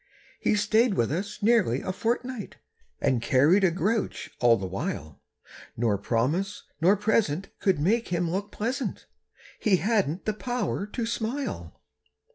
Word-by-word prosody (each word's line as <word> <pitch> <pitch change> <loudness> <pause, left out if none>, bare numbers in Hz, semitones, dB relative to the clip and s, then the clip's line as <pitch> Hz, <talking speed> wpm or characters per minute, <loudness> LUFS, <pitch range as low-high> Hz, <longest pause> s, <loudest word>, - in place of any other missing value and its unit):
He - - +2
stayed 215 +1 +3
with 115 +2 +1
us 200 +6 -4
nearly 205 - +3
a - - -3
fortnight 240 +1 -3 0.4
And 125 -3 +1
carried 145 +11 +4
a 190 - +6
grouch 200 +5 -1
all 120 -2 +5
the 95 - -4
while, 90 -5 -5 0.6
Nor 110 -4 +1
promise 150 - -1 0.2
nor 190 +5 +5
present 195 -4 +1
could 190 -2 +2
make 220 +10 +1
him 175 -1 0
look 200 +3 -3
pleasant; 245 +5 -3 0.5
He 210 -3 +3
hadn't 190 -4 0
the 215 - 0
power 225 -3 -2
to 230 +2 -3
smile. 225 - -4
195 Hz, 140 wpm, -27 LUFS, 145-220 Hz, 0.6 s, a